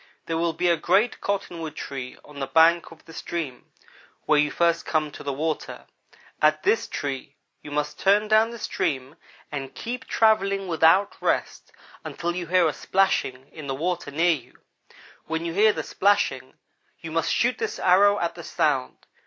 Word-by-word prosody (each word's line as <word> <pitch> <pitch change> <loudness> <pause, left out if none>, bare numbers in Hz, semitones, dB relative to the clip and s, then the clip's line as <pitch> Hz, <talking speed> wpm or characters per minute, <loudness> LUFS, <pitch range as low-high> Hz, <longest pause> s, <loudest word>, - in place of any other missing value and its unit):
There 165 0 -2
will 170 0 0
be 175 +2 0
a 170 -1 +3
great 210 +9 +1
cottonwood 170 -6 -3
tree 130 -3 -6
on 145 -1 -11
the 135 - -3
bank 165 +3 +4
of 165 - -16
the 165 - -13
stream 155 -8 -5 0.6
where 150 - +4
you 150 0 +3
first 170 +1 +1
come 155 -2 -1
to - - -10
the 140 - -3
water. 155 +3 -4 0.6
At 155 0 +3
this 225 - +2
tree, 140 0 -5 0.3
you - - -10
must 150 0 -3
turn 205 +2 +3
down 220 +1 +4
the 235 - -8
stream 135 - -2 0.4
and 135 -2 -6
keep 250 +2 -5
on - - -25
travelling 195 -3 +2
without 170 +4 +3
rest, - - -1 0.3
until 170 0 -4
you 175 -2 -4
hear 180 0 +4
a 155 - -1
splashing 135 -9 0
in 155 -3 -9
the 135 - -2
water 175 +1 -2
near 165 +4 +3
you. 140 -6 -9 0.7
When 160 +1 -3
you 165 - -3
hear 215 +4 +5
the - - -4
splashing, 205 +1 0 0.5
you - - -7
must - - 0
shoot - - +1
this 445 -1 -3
arrow 200 +3 +4
at 170 -3 -1
the - - -10
sound. 65 - -1
165 Hz, 180 wpm, -25 LUFS, 150-195 Hz, 0.7 s, hear